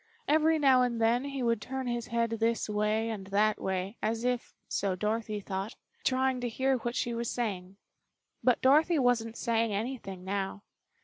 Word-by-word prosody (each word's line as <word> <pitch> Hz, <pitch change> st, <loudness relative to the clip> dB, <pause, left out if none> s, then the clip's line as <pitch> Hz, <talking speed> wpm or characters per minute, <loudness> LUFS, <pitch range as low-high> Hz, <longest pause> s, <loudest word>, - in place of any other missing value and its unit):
Every 315 Hz, +1 st, +4 dB
now 270 Hz, -4 st, +5 dB
and 240 Hz, -2 st, 0 dB
then 235 Hz, +3 st, +2 dB
he 275 Hz, -2 st, -3 dB
would 230 Hz, -2 st, +1 dB
turn 265 Hz, +3 st, -4 dB
his 240 Hz, -1 st, -2 dB
head 230 Hz, 0 st, 0 dB
this 225 Hz, 0 st, 0 dB
way 215 Hz, +2 st, 0 dB
and 195 Hz, -3 st, -6 dB
that 210 Hz, +2 st, +2 dB
way, 190 Hz, +3 st, -2 dB
as 225 Hz, +2 st, -1 dB
if, 250 Hz, -1 st, -1 dB, 0.2 s
so 195 Hz, -2 st, -1 dB
Dorothy 215 Hz, +2 st, -2 dB
thought, 195 Hz, +2 st, -4 dB, 0.3 s
trying 260 Hz, -1 st, +1 dB
to 245 Hz, -, -1 dB
hear 265 Hz, +3 st, +1 dB
what 240 Hz, 0 st, -4 dB
she 240 Hz, -, -1 dB
was 235 Hz, 0 st, -2 dB
saying. 195 Hz, -5 st, -3 dB, 0.7 s
But 250 Hz, -2 st, +3 dB
Dorothy 310 Hz, +6 st, +5 dB
wasn't 235 Hz, -4 st, +1 dB
saying 230 Hz, -2 st, +1 dB
anything 200 Hz, -4 st, -4 dB
now. 195 Hz, +1 st, -3 dB
230 Hz, 175 wpm, -30 LUFS, 210-250 Hz, 0.7 s, now